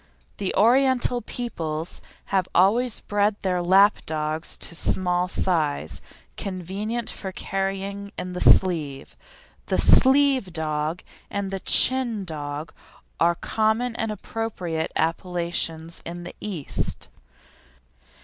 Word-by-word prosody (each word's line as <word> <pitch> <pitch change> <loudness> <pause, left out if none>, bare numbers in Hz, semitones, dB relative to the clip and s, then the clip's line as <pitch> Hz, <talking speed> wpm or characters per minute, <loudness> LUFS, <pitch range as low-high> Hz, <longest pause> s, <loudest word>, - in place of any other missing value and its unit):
The 195 -2 -2
Oriental 245 +2 +3
peoples 165 -9 -4 0.3
have 190 -2 +2
always 220 +6 +3
bred 205 0 +1
their 180 -2 +1
lap 195 +4 +5
dogs 155 0 -2
to - - -6
small 180 +1 +1
size, 155 - -1 0.4
convenient 200 +5 -3
for 190 - -6
carrying 195 +1 -3
in 180 0 -4
the 180 - -4
sleeve. 155 -7 +3 0.5
The - - +1
"sleeve 265 -7 +5
dog" 155 +1 -2 0.3
and 200 -1 -3
the 195 - -3
"chin 235 -1 +3
dog" 150 -1 -5 0.5
are 170 +1 +4
common 225 +5 0
and 225 -1 -2
appropriate 190 -7 -3
appellations 165 -1 -1
in 175 +1 -7
the 175 - -8
East. 180 -9 -3
185 Hz, 110 wpm, -24 LUFS, 165-215 Hz, 0.5 s, lap